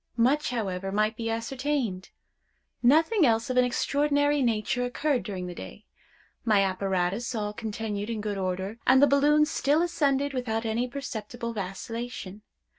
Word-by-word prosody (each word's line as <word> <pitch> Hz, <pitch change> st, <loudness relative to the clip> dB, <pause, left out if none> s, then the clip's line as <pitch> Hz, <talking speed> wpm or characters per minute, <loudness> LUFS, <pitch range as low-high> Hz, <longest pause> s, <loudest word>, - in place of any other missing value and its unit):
Much, 265 Hz, +6 st, +3 dB
however, 195 Hz, -5 st, -3 dB
might 215 Hz, +2 st, +1 dB
be 225 Hz, 0 st, -3 dB
ascertained. 235 Hz, -3 st, -2 dB, 0.7 s
Nothing 320 Hz, -, +4 dB
else 230 Hz, -1 st, +2 dB
of 255 Hz, -, -1 dB
an 250 Hz, -, +6 dB
extraordinary 285 Hz, +3 st, +1 dB
nature 235 Hz, 0 st, 0 dB
occurred 255 Hz, +2 st, 0 dB
during 185 Hz, -2 st, -5 dB
the 180 Hz, -, -6 dB
day. 95 Hz, -, -10 dB, 0.6 s
My 210 Hz, -4 st, +4 dB
apparatus 190 Hz, +4 st, -1 dB
all 210 Hz, -1 st, -2 dB
continued 210 Hz, -1 st, -4 dB
in 225 Hz, -2 st, -2 dB
good 205 Hz, -1 st, -3 dB
order, 190 Hz, +4 st, -3 dB
and 260 Hz, +1 st, +7 dB
the 285 Hz, -, +8 dB
balloon 290 Hz, +2 st, +4 dB
still 300 Hz, +1 st, +1 dB
ascended 285 Hz, -5 st, +1 dB
without 230 Hz, -3 st, -2 dB
any 230 Hz, +3 st, 0 dB
perceptible 235 Hz, -2 st, -5 dB
vacillation. 210 Hz, +1 st, -6 dB
230 Hz, 145 wpm, -27 LUFS, 205-275 Hz, 0.7 s, the